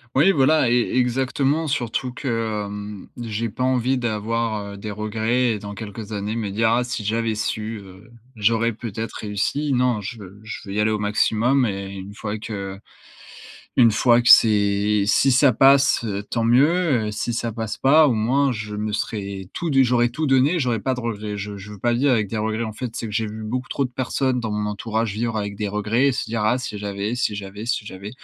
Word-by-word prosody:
Oui 165 +9 +5
voilà 150 -3 +3
e 120 - +2 0.2
exactement 135 +5 +1
surtout 125 -1 -2
que, 115 -5 -2
hem, 105 0 -7
j'ai 115 0 -2
pas 125 - -4
envie 130 0 +1
d'avoir, 110 -2 -2
heu, - - -9
des 105 +2 -6
regrets 110 +2 0
dans 100 0 -8
quelques 105 +1 -7
années 105 +1 -3
me 110 -3 -2
dire: 110 +3 +1
«Ah 125 +1 +2
si 125 -4 -4
j'avais 115 +1 0
su, 110 +1 -3
heu, 95 +4 -15 0.3
j'aurais 115 +1 +2
peut-être 115 0 -6
réussi». 110 +8 -1
Non, 125 -4 +1
je 115 +4 -6
veux 100 0 -12
je 110 - -7
veux 95 - -5
y 105 - -1
aller 110 +1 +3
au 110 - 0
maximum 110 +5 +2
et 95 -1 -4
une 100 +1 -8
fois 105 -1 -4
que 100 -3 -6 1.0
une 115 -3 +6
fois 120 +2 +4
que 120 - +1
c'est 105 -1 +5
si 135 +6 +4
ça 130 +1 +5
passe, 135 +2 +5
heu, 100 -1 -3
tant 115 +2 -2
mieux, 135 +1 +3
heu, 105 - -3
si 110 +3 -3
ça 115 0 -2
passe 110 -1 -4
pas, 150 +3 +5
au 130 - +2
moins 130 +5 +2
je 105 -2 -5
me 105 +1 -3
serais 100 -3 -4
tout 170 - -3
du 135 -2 +5
j'aurais 120 -1 +2
tout 155 +6 -3
donné, 135 +6 +3
j'aurais 120 -5 0
pas 130 -1 0
de - - -5
regrets. 105 -3 -4
Je 100 0 -6
je 100 +2 -10
veux 105 - -9
pas 120 0 +1
vivre 135 +3 +2
avec 110 -4 +1
des 110 - -3
regrets, 110 +1 -1
en 110 -2 -5
fait, 115 0 -6
c'est - - -4
que 105 - -7
j'ai 110 +1 0
vu 110 +1 -7
beaucoup 125 +4 -4
trop 140 - 0
de 125 - -7
personnes 130 0 -1
dans 110 -2 -3
mon 105 0 -1
entourage 110 +1 -2
vivre 115 +1 -2
avec 100 -1 -3
des 105 0 -3
regrets, 110 +7 +1
se 130 - -3
dire: 115 0 -3
«Ah 120 +3 +3
si 115 -5 -5
j'avais, 100 +2 -3
si 115 -4 -1
j'avais, 100 +2 -7
si 120 -3 -1
j'avais». 100 0 -8
110 Hz, 220 wpm, -22 LUFS, 105-125 Hz, 1.0 s, une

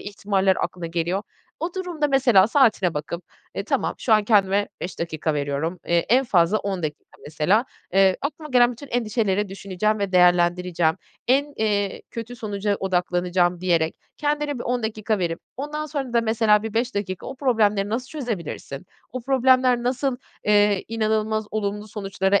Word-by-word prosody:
ihtimaller 195 -2 0
aklına 175 -2 -3
geliyor. 170 +4 -1 0.4
O 340 +2 -3
durumda 345 -6 -2
mesela 245 -8 +5
saatine 225 - +3
bakıp, 155 +4 -5 0.3
eee, - - -3
"Tamam, - - -1
şu 230 - 0
an 215 -1 +5
kendime 205 -2 +3
5 180 - -6
dakika 160 -2 -2
veriyorum. 145 +5 -2
Eee, 170 0 +3
en 260 +4 +4
fazla 180 0 +3
10 195 -3 -3
dakika 150 -1 -4 0.2
mesela. 160 - +1 0.3
Eee, 190 -1 +4
aklıma 305 +2 -4
gelen 245 -1 +5
bütün 280 +5 -11
endişeleri 215 -4 0
düşüneceğim 200 +2 -1
ve 200 -2 -2
değerlendireceğim. 175 -2 +3 0.3
En, 285 +3 +2
eee, 205 -2 0
kötü 230 +1 -7
sonuca 205 -2 -2
odaklanacağım." 180 -1 +1
diyerek 165 -3 +1 0.2
kendine 295 -2 -1
bir - - -5
10 245 0 -1
dakika 215 -1 -1
verip 170 -2 -2 0.2
ondan 300 +2 -4
sonra 275 -5 -4
da 235 - +4
mesela 220 -2 +3
bir 225 -1 -5
5 240 +2 0
dakika 185 -3 -4
o 270 - -6
problemleri 215 -7 +2
nasıl 240 +4 -2
çözebilirsin, 200 - -5 0.3
o 255 - -4
problemler 255 -1 +3
nasıl, 250 +1 0 0.3
eee, 205 -1 +3
inanılmaz 220 -1 0
olumlu 210 0 -3
sonuçlara 195 -1 0
210 Hz, 160 wpm, -23 LUFS, 185-245 Hz, 0.4 s, mesela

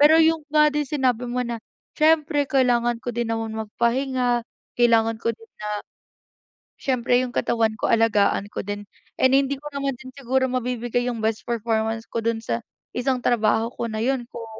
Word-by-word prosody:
Pero 300 +2 +7
yung 320 -1 +3
nga 300 0 +5
din 295 -1 -1
sinabi 250 -4 0
mo 250 +1 -1
na, 235 -1 -4 0.4
siyempre 305 -2 +3
kailangan 240 -3 +2
ko 245 - -2
din 235 -1 -1
namang 225 -1 -2
magpahinga, 245 +1 +1 0.4
kailangan 225 -2 +4
ko 230 - +2
din 450 0 -19
na - - -4 1.1
siyempre 245 -2 +2
yung 245 - -5
katawan 225 -2 +1
ko - - +1
alagaan 210 -3 +3
ko - - -3
din, 205 0 -5 0.3
and 260 0 +4
hindi 275 0 +1
ko 295 - -9
naman 275 -1 -1
din 260 -1 -10
siguro 260 0 +1
mabibigay 245 -1 -1
yung 230 - -5
best 220 0 0
performance 225 -1 -1
ko 230 -1 -3
dun 230 -1 0
sa 235 - -2 0.3
isang 255 +1 0
trabaho 225 -1 +2
ko 235 - -3
na 215 - -3
yun 260 -1 0
kung 230 -1 -7
240 Hz, 175 wpm, -23 LUFS, 225-265 Hz, 1.1 s, Pero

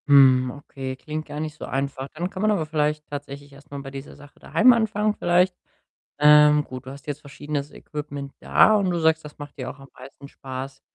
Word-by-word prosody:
Hm, 130 -3 +6
okay, 135 -1 -7
klingt 155 +3 -6
gar 150 - -6
nicht 155 0 -4
so - - -7
einfach. 135 0 -3
Dann 175 +3 -2
kann 190 -1 -6
man 215 0 +3
aber 190 -7 0
vielleicht 150 -1 -1
tatsächlich 140 0 -8
erst 140 +2 -17
mal 140 - -6
bei 135 -1 -9
dieser 135 0 -9
Sache 145 0 -17
daheim 250 +2 +5
anfangen 215 -2 +1
vielleicht. 180 0 +2 0.6
Ähm, 150 0 +7
gut, 130 -2 -9
du 130 - -7
hast 140 +1 -12
jetzt 145 0 -4
verschiedenes 145 0 -5
Equipment 145 -2 -7
da 215 - +5
und 200 -3 +2
du 175 -1 0
sagst, 160 0 +2
das 150 - -11
macht 145 0 -10
dir 130 -2 -4
auch 140 - -10
am 135 0 -14
meisten 135 +2 -12
Spaß. 135 0 -8
145 Hz, 215 wpm, -24 LUFS, 140-155 Hz, 0.6 s, Ähm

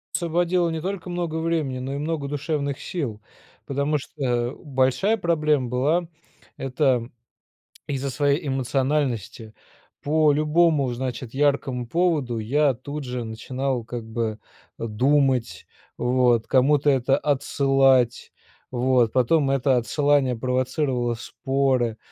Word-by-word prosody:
Освободил 175 +1 +1
не 160 -1 -3
только 185 0 -4
много 175 -2 -3
времени, 160 -5 -1
но 135 +2 -4
и - - -3
много 150 -1 -3
душевных 145 -1 -2
сил. 130 - -4 0.4
Потому 140 +2 0
что 125 -3 -2
большая 135 - +1
проблема 150 - +1
была 150 +8 +1 0.5
это 130 -3 0 0.8
из-за 140 -1 -3
своей 145 +4 0
эмоциональности 130 -4 -1 0.5
по 155 0 +3
любому, 150 -2 +2
значит, 125 -1 -5
яркому 140 -3 0
поводу 150 -6 0
я 140 +6 +2
тут 145 +4 -7
же 125 -1 -4
начинал 125 +3 -3
как 120 0 -6
бы 110 -1 -2 0.4
думать, 130 +2 +1 0.3
вот, 125 -2 +2
кому-то 140 +2 +3
это 135 0 +2
отсылать, 135 -3 +2 0.4
вот, 125 -2 +2
потом 135 +3 +2
это 135 -1 +2
отсылание 135 +2 +1
провоцировало 125 0 -1
споры, 130 -1 -1
135 Hz, 110 wpm, -24 LUFS, 125-150 Hz, 0.8 s, по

